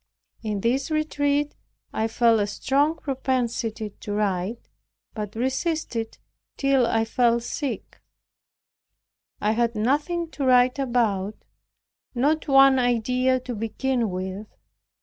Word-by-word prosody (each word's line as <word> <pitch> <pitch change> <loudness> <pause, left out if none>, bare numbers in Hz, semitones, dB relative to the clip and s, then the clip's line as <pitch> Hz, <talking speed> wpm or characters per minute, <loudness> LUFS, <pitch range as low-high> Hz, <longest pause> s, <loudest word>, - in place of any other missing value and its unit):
In 210 -3 -3
this 260 +7 0
retreat 290 -2 0 0.4
I 220 - 0
felt 230 0 +3
a 205 - +1
strong 285 +8 +1
propensity 240 -6 -2
to 205 - -5
write, 205 +1 -2 0.5
but 210 -1 -5
resisted 265 0 -1
it - - -22 0.4
till 275 -3 +3
I 225 -1 +1
fell 235 +1 +2
sick. 265 +3 -5 1.4
I 210 - +1
had 235 +1 +1
nothing 300 +9 0
to 285 - -4
write 250 0 +4
about, 220 -6 0 0.8
not 300 +6 +1
one 270 -1 +6
idea 250 +2 +2
to 250 0 -5
begin 230 +2 -1
with. 190 +3 -5
245 Hz, 115 wpm, -24 LUFS, 220-275 Hz, 1.4 s, one